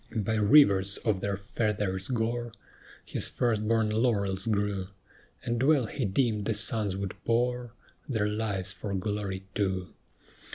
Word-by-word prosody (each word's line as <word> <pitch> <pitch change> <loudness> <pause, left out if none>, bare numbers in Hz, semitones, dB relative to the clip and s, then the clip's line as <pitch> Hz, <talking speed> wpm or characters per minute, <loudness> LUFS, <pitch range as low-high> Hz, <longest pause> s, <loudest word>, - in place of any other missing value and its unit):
By 110 0 0
rivers 100 -4 +5
of 105 -4 +1
their 100 -1 -1
fathers' 100 -2 -2
gore 120 -1 -2 0.5
His - - +1
first 110 -3 0
born 110 -1 +2
laurels 100 -4 0
grew, 100 -3 0 0.6
And 120 0 -1
well 140 -2 +4
he 125 +2 -3
deemed 105 0 0
the 115 - 0
sons 105 -3 +1
would 100 -1 -3
pour 120 0 0 0.4
Their 110 -5 +1
lives 105 -3 -2
for 100 -2 -5
glory 100 -1 -3
too. 95 -3 -2
105 Hz, 135 wpm, -29 LUFS, 100-115 Hz, 0.6 s, rivers